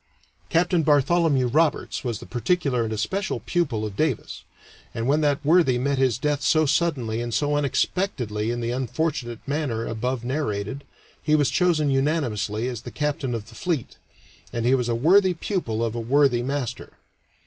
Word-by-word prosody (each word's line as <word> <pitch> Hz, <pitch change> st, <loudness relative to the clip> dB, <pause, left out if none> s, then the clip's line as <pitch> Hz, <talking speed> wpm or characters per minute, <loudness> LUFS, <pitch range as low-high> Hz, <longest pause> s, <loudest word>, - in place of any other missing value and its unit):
Capt. 175 Hz, +2 st, +2 dB
Bartholomew 150 Hz, -1 st, +3 dB
Roberts 130 Hz, -3 st, +1 dB
was 120 Hz, -4 st, -2 dB
the -, -, -11 dB
particular 125 Hz, -, 0 dB
and 110 Hz, -, -3 dB
especial 190 Hz, -, -2 dB
pupil 140 Hz, -12 st, -1 dB
of 105 Hz, -2 st, -6 dB
Davis, 155 Hz, -3 st, -2 dB, 0.5 s
and 115 Hz, -, -2 dB
when 150 Hz, +3 st, +3 dB
that 145 Hz, -1 st, +1 dB
worthy 155 Hz, -5 st, +4 dB
met 140 Hz, +2 st, 0 dB
his 130 Hz, -4 st, +2 dB
death 145 Hz, +1 st, -1 dB
so 155 Hz, +4 st, +3 dB
suddenly 130 Hz, -8 st, 0 dB
and 120 Hz, -1 st, -3 dB
so 145 Hz, 0 st, +1 dB
unexpectedly 135 Hz, -, -1 dB
in 120 Hz, 0 st, -2 dB
the 115 Hz, 0 st, -2 dB
unfortunate 125 Hz, -1 st, -3 dB
manner 135 Hz, -6 st, -1 dB
above 120 Hz, +2 st, -3 dB
narrated, 130 Hz, -2 st, -3 dB, 0.4 s
he 155 Hz, 0 st, +2 dB
was 145 Hz, -3 st, +2 dB
chosen 160 Hz, -5 st, +2 dB
unanimously 125 Hz, -6 st, 0 dB
as 120 Hz, -4 st, -4 dB
the -, -, -8 dB
captain 145 Hz, -4 st, -2 dB
of 110 Hz, -2 st, -6 dB
the -, -, -14 dB
fleet, 165 Hz, -9 st, -3 dB, 0.5 s
and 115 Hz, -1 st, -2 dB
he 125 Hz, -, +4 dB
was 125 Hz, -2 st, +1 dB
a 115 Hz, -, +1 dB
worthy 180 Hz, +8 st, +4 dB
pupil 140 Hz, -, -2 dB
of 110 Hz, -, -3 dB
a 120 Hz, -, -3 dB
worthy 130 Hz, +1 st, +3 dB
master. 135 Hz, -1 st, -4 dB
135 Hz, 170 wpm, -24 LUFS, 120-155 Hz, 0.5 s, worthy